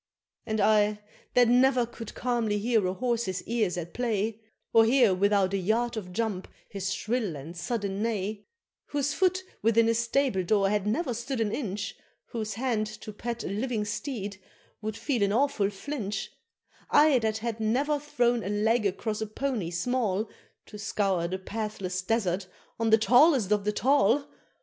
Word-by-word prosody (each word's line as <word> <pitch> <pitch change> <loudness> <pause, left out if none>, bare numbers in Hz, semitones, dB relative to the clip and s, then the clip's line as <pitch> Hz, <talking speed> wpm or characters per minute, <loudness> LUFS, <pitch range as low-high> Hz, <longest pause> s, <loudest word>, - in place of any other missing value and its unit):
And 220 -1 -1
I, 210 0 +4 0.4
that 245 -1 +6
ne'er 250 +1 +4
could 230 -1 -9
calmly 235 -4 0
hear 220 -2 +2
a 185 - -1
horse's 230 -6 -1
ears 215 -6 0
at 170 -1 -5
play 225 -2 -1 0.3
Or 225 - +7
hear 235 -3 +4
without 200 0 +2
a - - +2
yard 230 +6 0
of 190 -5 -6
jump 200 -2 -2 0.2
his 195 -1 -3
shrill 215 -3 -1
and 150 +5 -8
sudden 200 +2 -3
neigh 210 -2 -2 0.4
Whose 285 0 -1
foot 370 +3 +1 0.2
within 230 +1 +4
a 230 - +3
stable 235 -3 +1
door 195 +1 +2
had 210 -1 0
never 250 +4 0
stood 240 +3 -4
an 220 -2 +1
inch 205 -5 -3 0.3
Whose 215 -3 -4
hand 230 -3 0
to 215 0 -9
pat 235 +2 -4
a - - -4
living 215 +2 -2
steed 205 -3 -4 0.4
would 215 0 -4
feel 260 -7 -1
an 200 0 +3
awful 230 -4 +2
flinch, 205 -1 -4 0.6
I 295 -3 +5
that 220 -1 0
had 225 0 -4
never 270 +7 +1
thrown 245 -5 +1
a 195 - -3
leg 215 +1 +2
across 210 +3 -3
a 220 - -2
pony 225 -5 -2
small, 215 +2 0 0.4
To 210 - -11
scour 195 -4 0
the 185 +2 -3
pathless 195 -2 -4
desert 190 -2 0 0.3
on 225 -1 +1
the 220 - +7
tallest 245 - +5
of 210 -1 +2
the 210 - +2
tall! 270 +2 +3
220 Hz, 170 wpm, -28 LUFS, 200-240 Hz, 0.6 s, Or